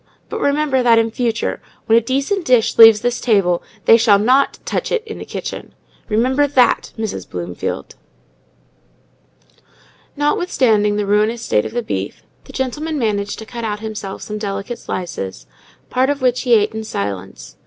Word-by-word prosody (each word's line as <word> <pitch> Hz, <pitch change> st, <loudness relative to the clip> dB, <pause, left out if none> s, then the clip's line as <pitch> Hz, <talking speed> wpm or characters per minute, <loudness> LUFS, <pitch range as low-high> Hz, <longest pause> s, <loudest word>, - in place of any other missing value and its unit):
But -, -, -4 dB
remember 285 Hz, -2 st, +1 dB
that, 235 Hz, -2 st, +5 dB
in 225 Hz, 0 st, +2 dB
future, 235 Hz, -1 st, -2 dB, 0.2 s
when 225 Hz, -, +4 dB
a 230 Hz, -, +5 dB
decent 275 Hz, -, -1 dB
dish 250 Hz, -6 st, +2 dB
leaves 225 Hz, -2 st, +9 dB
this 245 Hz, 0 st, -1 dB
table, 195 Hz, -7 st, +2 dB, 0.2 s
they 225 Hz, -, +7 dB
shall 220 Hz, -3 st, +5 dB
not 255 Hz, +7 st, +2 dB
touch -, -, -2 dB
it 475 Hz, -3 st, 0 dB
in 440 Hz, -, -8 dB
the -, -, -7 dB
kitchen. -, -, -7 dB, 0.3 s
Remember 260 Hz, +6 st, +2 dB
that, 265 Hz, -3 st, +2 dB
Mrs. 215 Hz, -, -5 dB
Bloomfield!" 85 Hz, -5 st, -5 dB, 2.2 s
Notwithstanding 255 Hz, -, +1 dB
the 210 Hz, 0 st, -1 dB
ruinous 215 Hz, +3 st, +1 dB
state 105 Hz, -, +1 dB
of -, -, -6 dB
the 240 Hz, 0 st, -2 dB
beef, 95 Hz, -, -4 dB, 0.2 s
the -, -, -12 dB
gentleman 295 Hz, +4 st, -3 dB
managed 205 Hz, -5 st, -1 dB
to 220 Hz, -, -8 dB
cut 225 Hz, -3 st, -4 dB
himself 215 Hz, -3 st, -6 dB
some 210 Hz, 0 st, -5 dB
delicate 200 Hz, +3 st, -4 dB
slices, 95 Hz, -, -5 dB, 0.5 s
part 260 Hz, +2 st, +2 dB
of 285 Hz, -1 st, -1 dB
which 250 Hz, -1 st, +2 dB
he 245 Hz, -3 st, +4 dB
ate 210 Hz, 0 st, +2 dB
in 220 Hz, 0 st, -4 dB
silence. 95 Hz, -, -6 dB
225 Hz, 160 wpm, -18 LUFS, 205-255 Hz, 2.2 s, leaves